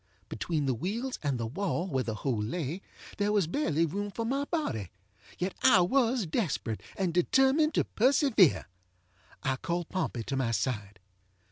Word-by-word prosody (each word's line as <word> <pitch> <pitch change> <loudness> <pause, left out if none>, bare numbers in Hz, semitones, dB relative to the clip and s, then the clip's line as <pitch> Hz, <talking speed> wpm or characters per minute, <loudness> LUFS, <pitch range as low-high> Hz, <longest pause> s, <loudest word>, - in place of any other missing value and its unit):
Between 150 +7 -2
the 130 - +1
wheels 225 - -3
and 140 -4 0
the 115 - -1
wall 175 - -2
where 135 -7 0
the 110 -2 -3
hole 115 -1 -1
lay 155 - -3 0.4
there 205 0 +2
was 205 -4 +3
barely 165 - +1
room 200 +6 -3
for 225 +3 -4
my 275 +4 0
bodyŌĆöyet 110 - -5
I 190 - +6
was 235 +3 +2
desperate, 155 - -2 0.2
and 185 -4 0
determined 265 - +3
to - - +3
persevere. 245 - +3 0.8
I 135 -2 0
called 170 +4 -3
Pompey 160 -10 -2
to 135 - -3
my 130 -3 0
side. 105 -4 -2
175 Hz, 155 wpm, -30 LUFS, -, 0.8 s, I